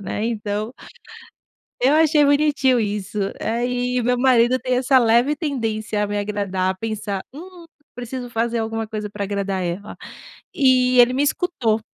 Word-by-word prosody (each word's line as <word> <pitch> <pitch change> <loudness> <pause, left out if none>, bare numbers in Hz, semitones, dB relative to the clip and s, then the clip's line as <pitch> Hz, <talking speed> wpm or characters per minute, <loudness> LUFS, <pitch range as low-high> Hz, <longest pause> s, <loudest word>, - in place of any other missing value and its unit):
né, 205 +2 -4
então. 215 -1 -3 1.1
Eu 285 +4 +4
achei 310 -1 +4
bonitinho 285 -3 +3
isso, 210 -1 -3 0.2
aí 245 +2 -1
meu 250 +1 +1
marido 250 -1 +4
tem 255 0 -1
essa 260 +1 +3
leve 240 +4 +3
tendência 225 -8 -2
a 205 - 0
me 205 0 -3
agradar, 195 -2 -2
pensar: 210 -3 -4
"hum, 350 +3 -11 0.3
preciso 245 0 -6
fazer 235 0 -1
alguma 225 0 -3
coisa 210 -1 -5
para 200 0 -4
agradar 200 -1 -2
ela", 180 +4 -5 0.6
e 255 -2 +3
ele 245 +1 +6
me 270 - 0
escutou. 280 - 0
235 Hz, 145 wpm, -21 LUFS, 210-260 Hz, 1.1 s, ele